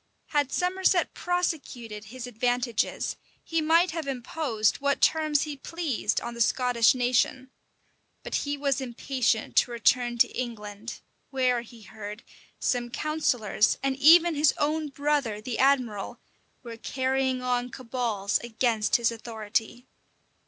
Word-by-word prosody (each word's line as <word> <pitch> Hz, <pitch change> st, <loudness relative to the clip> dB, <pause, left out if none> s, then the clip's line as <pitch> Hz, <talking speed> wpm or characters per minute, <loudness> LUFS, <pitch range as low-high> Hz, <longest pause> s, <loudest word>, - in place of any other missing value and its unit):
[*] -, -, -45 dB
Had 285 Hz, -2 st, +2 dB
Somerset 365 Hz, 0 st, +1 dB
prosecuted 275 Hz, -12 st, -3 dB
his 250 Hz, +3 st, -8 dB
advantages, 245 Hz, -1 st, -1 dB, 0.3 s
he 330 Hz, -1 st, -1 dB
might 330 Hz, +3 st, +4 dB
have 320 Hz, -3 st, -4 dB
imposed 245 Hz, -3 st, -1 dB
what 280 Hz, 0 st, 0 dB
terms 310 Hz, -2 st, +3 dB
he 300 Hz, -2 st, -5 dB
pleased 285 Hz, -7 st, -2 dB
on 235 Hz, -, -5 dB
the 235 Hz, -, -5 dB
Scottish 245 Hz, 0 st, +3 dB
nation: 255 Hz, +1 st, 0 dB, 0.7 s
but -, -, -7 dB
he 285 Hz, 0 st, -1 dB
was 280 Hz, -1 st, 0 dB
impatient 245 Hz, -2 st, -1 dB
to -, -, +5 dB
return 240 Hz, 0 st, +1 dB
to -, -, +5 dB
England, 220 Hz, -2 st, -6 dB, 0.3 s
where, 255 Hz, -3 st, +1 dB
he 235 Hz, -1 st, -14 dB
heard, 210 Hz, +1 st, -9 dB, 0.3 s
some 245 Hz, -1 st, -1 dB
counsellors, 245 Hz, -7 st, +1 dB
and 270 Hz, -1 st, +1 dB
even 335 Hz, +4 st, +7 dB
his 295 Hz, -1 st, +3 dB
own 305 Hz, +1 st, 0 dB
brother, 280 Hz, -6 st, -1 dB
the 230 Hz, +2 st, -5 dB
admiral, 255 Hz, -7 st, +1 dB, 0.4 s
were 230 Hz, -2 st, -8 dB
carrying 260 Hz, +1 st, -1 dB
on 245 Hz, 0 st, 0 dB
cabals 230 Hz, -5 st, -2 dB
against 230 Hz, -2 st, 0 dB
his 235 Hz, -1 st, +3 dB
authority. 225 Hz, +1 st, -3 dB
250 Hz, 130 wpm, -27 LUFS, 230-285 Hz, 0.7 s, even